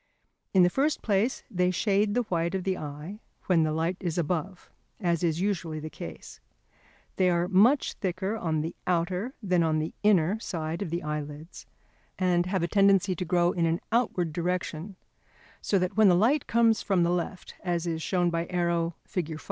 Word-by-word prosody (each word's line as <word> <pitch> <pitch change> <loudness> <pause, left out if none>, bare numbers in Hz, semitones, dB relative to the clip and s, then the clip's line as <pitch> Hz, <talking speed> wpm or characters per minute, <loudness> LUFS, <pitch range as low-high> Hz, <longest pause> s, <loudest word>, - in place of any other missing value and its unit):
In 185 -2 +5
the 175 - +5
first 290 +6 0
place 210 +4 +1
they 180 -2 +2
shade 205 +3 +1
the 245 - +2
white 170 -3 -1
of 190 - -2
the 190 0 0
eye 150 +7 -7 0.3
when 175 -3 +3
the 155 -1 +1
light 165 +3 -1
is 175 -2 -3
above, 175 +2 -3 0.3
as 175 -4 0
is 165 -1 +1
usually 170 -6 -2
the 155 +1 -7
case. - - -9 0.8
They 185 -1 +3
are 175 0 +1
much 215 +9 +4
thicker 190 +2 -2
on 160 -7 -1
the 160 +2 -4
outer 180 +7 -1
than 180 -3 +2
on 160 -1 +2
the 155 +1 -2
inner 205 -1 +3
side 165 -4 -4
of 195 - -3
the 170 +2 -3
eyelids, 150 +1 -6 0.5
and 180 -1 +2
have 185 -2 0
a - - +1
tendency 195 -1 +3
to 180 - -4
grow 175 0 +2
in 170 -2 0
an 165 +1 0
outward 190 -9 +1
direction, 180 +1 -3 0.7
so 200 - +1
that 185 +1 -1
when 215 -2 +6
the 180 - +5
light 250 +10 +2
comes 230 -2 +3
from 190 -3 +2
the 170 - +2
left, 180 +1 -3
as 175 -2 -1
is 165 -2 -2
shown 175 0 +1
by 165 0 -2
arrow, 170 -2 0
Fig. 165 -5 -4
180 Hz, 190 wpm, -27 LUFS, 165-195 Hz, 0.8 s, when